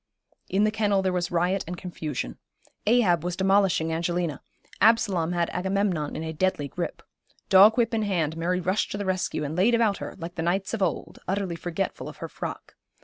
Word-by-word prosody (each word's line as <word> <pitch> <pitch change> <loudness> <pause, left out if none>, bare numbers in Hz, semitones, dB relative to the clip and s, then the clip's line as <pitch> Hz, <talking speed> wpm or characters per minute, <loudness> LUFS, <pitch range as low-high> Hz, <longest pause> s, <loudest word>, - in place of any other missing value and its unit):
In 195 +2 +2
the 215 - +3
kennel 205 -3 +1
there 185 -1 +1
was 175 -1 -1
riot 180 +3 +1
and 180 +1 -5
confusion. 150 - -5 0.5
Ahab 210 -8 +4
was 180 0 -2
demolishing 190 -4 +2
Angelina, 170 -2 -1 0.4
Absalom 195 -7 +3
had 170 -1 0
Agamemnon 190 -4 -1
in 160 - -4
a 160 0 -4
deadly 160 -3 0
grip. - - -5 0.5
Dog 200 +4 +7
whip 235 0 +2
in 225 - +1
hand, 170 -7 0
Mary 175 +2 0
rushed 185 +3 0
to - - -3
the 205 - -3
rescue, 185 -4 -1
and 150 +2 -3
laid 210 +7 +4
about 225 -4 +2
her, - - -7
like 170 -1 -7
the 165 - -4
knights 190 +5 -1
of 225 - -2
old, 180 -4 -2
utterly 190 -2 -1
forgetful 175 +3 -3
of - - -11
her - - -5
frock. - - -7
185 Hz, 195 wpm, -26 LUFS, 170-200 Hz, 0.5 s, Dog